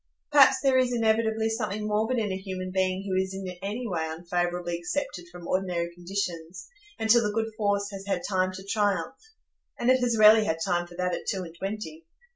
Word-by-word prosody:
Perhaps 270 -2 +6
there 265 -2 +4
is 255 -1 +2
inevitably 220 -1 +1
something 215 -2 -2
morbid 220 +4 +1
in 215 -4 0
a - - -1
human 185 -1 -5
being 190 0 0
who 195 - -2
is 190 0 0
in 195 -1 -5
any 210 +6 -4
way 165 -5 -2
unfavourably 175 +1 -2
excepted 175 +1 -4
from 175 -1 -10
ordinary 175 -2 -1
conditions, 175 -1 -5 0.3
until 225 +2 +4
the 210 -2 0
good 225 +1 -2
force 205 -1 0
has 195 0 -8
had 200 - -1
time 185 -2 +1
to 190 +1 -9
triumph; 200 -5 0 0.6
and 240 +2 +3
it 260 - +4
has 240 -2 +1
rarely 215 +1 +8
had 160 -5 0
time 175 0 0
for 175 - -13
that 180 0 -1
at - - -5
two 190 -2 -1
and 165 -1 -10
twenty. 170 -5 -6
195 Hz, 200 wpm, -27 LUFS, 180-220 Hz, 0.6 s, rarely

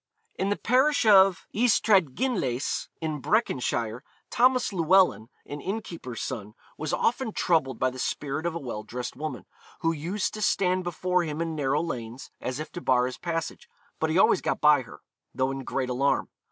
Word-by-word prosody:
In 195 - -2
the 205 - 0
parish 260 +4 +2
of 195 -3 +6
Ystradgynlais, 200 - +1
in 155 -3 -3
Breconshire, 125 - 0 0.3
Thomas 255 -2 +3
Llewellyn, 170 - +3 0.2
an 145 0 -7
innkeeper's 175 - -5
son, 105 -4 -6 0.2
was 155 0 -4
often 230 +6 0
troubled 135 -8 +1
by 130 +2 +1
the 130 - -9
spirit 145 +5 -2
of 170 - -3
a - - -2
well 120 -7 -5
dressed 120 +3 -6
woman, 155 +4 -5 0.4
who 165 - +2
used 170 +6 -2
to 215 - -6
stand 185 -3 +2
before 180 +1 0
him 155 -1 -4
in 165 -1 -2
narrow 145 +1 0
lanes, 120 -5 -6
as 130 +2 -3
if 155 - -6
to 175 - -7
bar 125 -4 +3
his 125 0 -5
passage, 165 -1 -4 0.3
but 160 - 0
he 160 - +1
always - - +4
got - - -1
by 150 -2 +5
her, 120 - -13 0.3
though 130 +1 +1
in 135 0 -5
great 130 0 -2
alarm. 135 +3 +1
160 Hz, 175 wpm, -27 LUFS, 130-190 Hz, 0.4 s, of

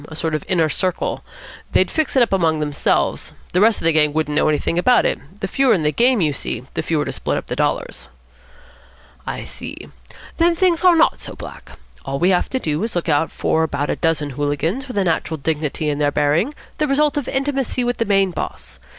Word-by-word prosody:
A 155 - -10
sort 160 0 -2
of 155 - -1
Inner 165 -4 +2
Circle. 180 +5 -2 0.5
They'd - - +3
fix 315 -4 -1
it 260 - +6
up 230 - -1
among 165 -4 +2
themselves. 150 -1 0 0.2
The 180 - +3
rest 225 +1 +4
of - - -5
the 165 - +5
gang 150 -2 +3
wouldn't 155 -1 -1
know 155 - +3
anything 155 +3 0
about 245 +7 +4
it. - - 0 0.2
The 195 - -1
fewer 265 +4 +3
in 165 - -1
the 150 - +2
game, 240 +3 +3
you 150 -3 +2
see, 125 -2 -4
the - - -1
fewer 155 -3 -1
to - - -3
split - - -2
up - - -4
the - - -4
dollars." - - -2 1.2
"I - - -4
see. - - -9 0.5
Then 340 +1 +3
things 350 -1 +2
are 360 -2 +6
not 325 - +3
so - - -6
black. - - -10 0.3
All 135 0 -3
we 180 +5 +3
have 180 - +1
to 260 - -1
do 155 -6 -2
is 225 - -3
to - - -1
look 170 - -2
out 150 +1 +2
for 160 - 0
about 145 -2 -1
a - - -1
dozen 160 -3 0
hooligans 145 - -2
with 250 - -6
a 200 - +3
natural 165 -2 -1
dignity 155 +1 -2
in 145 -1 -1
their 145 -1 +2
bearing, 150 - +1 0.2
the 305 - +2
result 295 +2 +2
of 290 -4 -2
intimacy 270 -2 -1
with 245 0 -1
the 230 - 0
main 195 -2 +2
boss. - - -6
170 Hz, 230 wpm, -20 LUFS, 150-250 Hz, 1.2 s, it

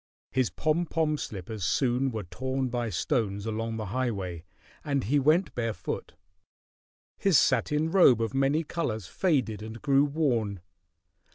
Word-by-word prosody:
His 130 -4 +1
pom 155 - 0
pom 155 -2 +1
slippers 105 - -6
soon 125 +7 +1
were 110 -4 -4
torn 130 +7 -3
by 120 -1 -2
stones 100 +3 -1
along 115 +1 -3
the 110 - -3
highway, 100 -10 -2 0.4
and 140 -3 0
he 145 +8 +2
went 155 +4 +3
barefoot. 115 -7 -4 1.0
His 195 -6 +4
satin 150 +4 +2
robe 155 - +6
of 115 +2 -1
many 135 +4 +2
colors 120 - -3
faded 130 - 0
and 110 +2 -7
grew 140 -1 +3
worn. 120 - 0
125 Hz, 135 wpm, -28 LUFS, 110-145 Hz, 1.0 s, robe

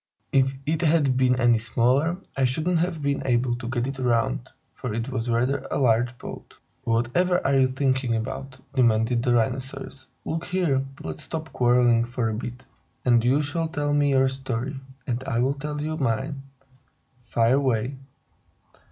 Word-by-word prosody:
If 135 0 +3
it 155 +2 0
had 150 -5 +3
been 125 -1 +3
any 120 -2 +4
smaller, 130 +9 +1 0.2
I 135 - +2
shouldn't 160 +7 +1
have 165 -3 -1
been 140 0 0
able 120 -1 +1
to 120 -1 -6
get 120 -1 -1
it 135 0 -5
round, 115 - 0 0.2
for 125 - -5
it 115 +3 -3
was 120 -2 -3
rather 125 +4 +1
a - - -1
large 120 -1 +2
boat." - - -10 0.3
"Whatever 125 +11 +2
are 135 0 +3
you 130 - +5
talking 130 -2 0
about?" 130 +4 -5
demanded 115 -1 +3
the 120 0 +2
Rhinoceros. 130 +2 -2 0.2
"Look 165 +1 -3
here! 165 -8 +1 0.2
Let's 80 -1 -6
stop 160 -1 -6
quarreling 120 -1 +4
for 120 -1 -2
a - - -2
bit, 120 +3 -6 0.4
and 120 -2 +4
you 135 +5 +3
shall 160 +3 -1
tell 145 -2 -1
me 145 -1 +3
your 135 -1 +4
story 130 0 -4 0.3
and 125 +1 -2
I'll 125 +2 +1
tell 150 +1 -5
you 155 +1 -2
mine. 135 +1 -1 0.8
Fire 115 +2 +2
away!" 130 -1 0
130 Hz, 165 wpm, -25 LUFS, 120-140 Hz, 0.8 s, you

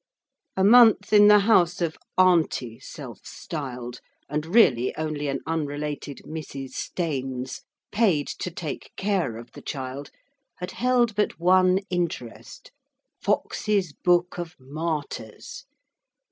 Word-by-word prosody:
A 190 - +2
month 220 -1 +6
in 205 0 +8
the 210 0 +7
house 185 -4 +3
of 170 -3 -1 0.2
'Auntie' 165 -10 +2
self - - -9
styled, 125 -5 -6 0.3
and 150 +1 -3
really 135 - +4
only 155 -2 -3
an 135 - -2
unrelated 145 -3 -4
Mrs. 140 -4 -7
Staines, 130 -6 -4 0.3
paid 195 -10 +2
to - - -3
take 160 -4 -6
care 190 - 0
of 115 - -11
the - - -12
child, 135 0 -6 0.5
had 180 +1 -6
held 245 -2 +2
but 210 -3 -1
one 185 +1 +4
interest 170 -10 -4 0.5
Foxe's 195 -7 0
Book 175 +1 +1
of 175 0 -6
Martyrs. 145 -5 -5
165 Hz, 120 wpm, -25 LUFS, 140-185 Hz, 0.5 s, in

